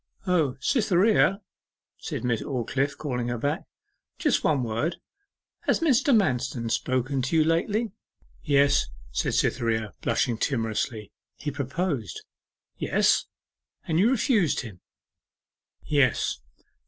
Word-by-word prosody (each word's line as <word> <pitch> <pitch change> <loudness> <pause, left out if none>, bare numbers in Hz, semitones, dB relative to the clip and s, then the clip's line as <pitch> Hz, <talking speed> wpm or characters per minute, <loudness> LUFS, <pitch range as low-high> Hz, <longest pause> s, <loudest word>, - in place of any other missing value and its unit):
'O, 160 -8 +1
Cytherea,' 200 - +3 0.6
said - - -5
Miss 120 -3 0
Aldclyffe, 135 +2 -2
calling 125 -5 -3
her 120 0 -2
back; 140 +6 -2 0.5
'just - - +1
one 145 -5 +2
word. 120 +9 -1 0.7
Has - - +3
Mr. 280 -4 +3
Manston 130 - +1
spoken 130 +2 0
to 135 +6 -1
you 160 - +5
lately?' 205 +8 0 0.5
'Yes,' 140 -2 +3 0.2
said - - -1
Cytherea, 110 -3 0
blushing 115 -2 0
timorously. 115 -4 -2 0.2
'He 145 - -4
proposed?' 140 - -3 0.5
'Yes.' - - +2 0.6
'And 160 0 +1
you 210 +5 +5
refused 225 - +2
him?' 105 -8 -10 1.0
'Yes. 140 -6 +1
140 Hz, 110 wpm, -26 LUFS, 120-175 Hz, 1.0 s, you